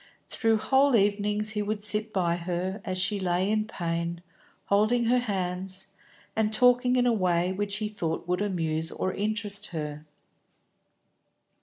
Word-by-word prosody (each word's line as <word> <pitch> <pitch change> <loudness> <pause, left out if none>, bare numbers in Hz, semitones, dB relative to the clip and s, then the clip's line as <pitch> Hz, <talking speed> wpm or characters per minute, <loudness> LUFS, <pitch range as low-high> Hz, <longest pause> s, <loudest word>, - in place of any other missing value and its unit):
Through 225 -1 +2
whole 265 +4 +3
evenings 210 +1 +1
he 210 -1 -2
would 205 0 -3
sit 215 +1 +1
by 175 -5 +1
her, 180 +3 -3
as 185 -4 -3
she 195 +3 +2
lay 185 +2 0
in 215 0 0
pain, 170 -2 -3 0.4
holding 215 +4 +2
her 250 +2 +3
hands, 190 -3 -3 0.5
and 220 -1 +1
talking 250 +2 +4
in 250 -1 +3
a 245 - +3
way 180 -3 +1
which 200 +1 -1
he 215 0 -1
thought 170 -6 -4
would 180 +2 0
amuse 165 -5 -1
or 185 - -2
interest 210 -1 -1
her. 150 -2 -5
200 Hz, 150 wpm, -27 LUFS, 180-215 Hz, 0.5 s, talking